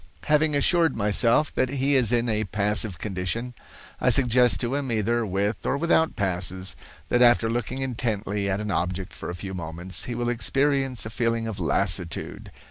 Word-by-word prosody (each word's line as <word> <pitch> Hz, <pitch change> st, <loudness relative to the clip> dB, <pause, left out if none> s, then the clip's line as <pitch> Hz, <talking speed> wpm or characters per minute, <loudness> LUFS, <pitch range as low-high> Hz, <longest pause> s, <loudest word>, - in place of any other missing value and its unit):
"Having 150 Hz, 0 st, +2 dB
assured 165 Hz, 0 st, +3 dB
myself 115 Hz, +7 st, +3 dB
that 130 Hz, -, 0 dB
he 140 Hz, +1 st, 0 dB
is 125 Hz, -5 st, +5 dB
in 120 Hz, 0 st, +1 dB
a 110 Hz, -1 st, 0 dB
passive 105 Hz, -1 st, -1 dB
condition, 105 Hz, +6 st, -3 dB, 0.5 s
I -, -, +2 dB
suggest 125 Hz, -6 st, +4 dB
to 120 Hz, +2 st, -1 dB
him, 140 Hz, -3 st, -2 dB
either 115 Hz, +1 st, 0 dB
with 100 Hz, +3 st, -2 dB
or -, -, 0 dB
without 160 Hz, +1 st, +2 dB
passes, 95 Hz, -1 st, -1 dB, 0.3 s
that 120 Hz, -, +2 dB
after 120 Hz, -2 st, +5 dB
looking 120 Hz, +3 st, -3 dB
intently 105 Hz, -5 st, -2 dB
at 95 Hz, +1 st, -1 dB
an 105 Hz, -1 st, -3 dB
object 90 Hz, +1 st, -2 dB
for -, -, -7 dB
a 90 Hz, -, -5 dB
few 95 Hz, +2 st, -7 dB
moments, 90 Hz, +3 st, -2 dB
he 120 Hz, -, -5 dB
will 120 Hz, 0 st, -2 dB
experience 135 Hz, +1 st, 0 dB
a 110 Hz, -, -6 dB
feeling 115 Hz, -1 st, -1 dB
of 110 Hz, -3 st, -5 dB
lassitude. 90 Hz, -3 st, -2 dB
115 Hz, 175 wpm, -25 LUFS, 100-125 Hz, 0.5 s, is